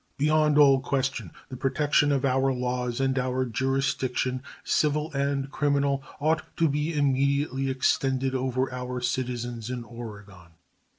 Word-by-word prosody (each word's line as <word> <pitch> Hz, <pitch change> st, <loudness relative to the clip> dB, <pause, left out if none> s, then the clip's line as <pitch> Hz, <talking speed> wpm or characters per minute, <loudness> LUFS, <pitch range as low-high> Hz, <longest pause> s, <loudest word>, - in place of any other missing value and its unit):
Beyond 150 Hz, 0 st, +3 dB
all 140 Hz, -2 st, +7 dB
question 130 Hz, -7 st, -2 dB, 0.2 s
the 130 Hz, -, -6 dB
protection 145 Hz, +3 st, +2 dB
of 140 Hz, -1 st, +1 dB
our 135 Hz, 0 st, +2 dB
laws 125 Hz, -1 st, -2 dB
and 135 Hz, 0 st, +1 dB
our 130 Hz, 0 st, 0 dB
jurisdiction, 130 Hz, +1 st, -1 dB, 0.2 s
civil 150 Hz, +1 st, 0 dB
and 140 Hz, 0 st, -1 dB
criminal, 140 Hz, -2 st, +1 dB, 0.2 s
ought 155 Hz, +2 st, +2 dB, 0.2 s
to 165 Hz, -, +3 dB
be 150 Hz, +2 st, -1 dB
immediately 140 Hz, -1 st, +1 dB
extended 130 Hz, 0 st, +1 dB
over 130 Hz, 0 st, -1 dB
our 125 Hz, 0 st, -4 dB
citizens 120 Hz, -2 st, -3 dB
in 125 Hz, -1 st, -4 dB
Oregon. 105 Hz, -7 st, -11 dB
135 Hz, 130 wpm, -26 LUFS, 125-140 Hz, 0.2 s, all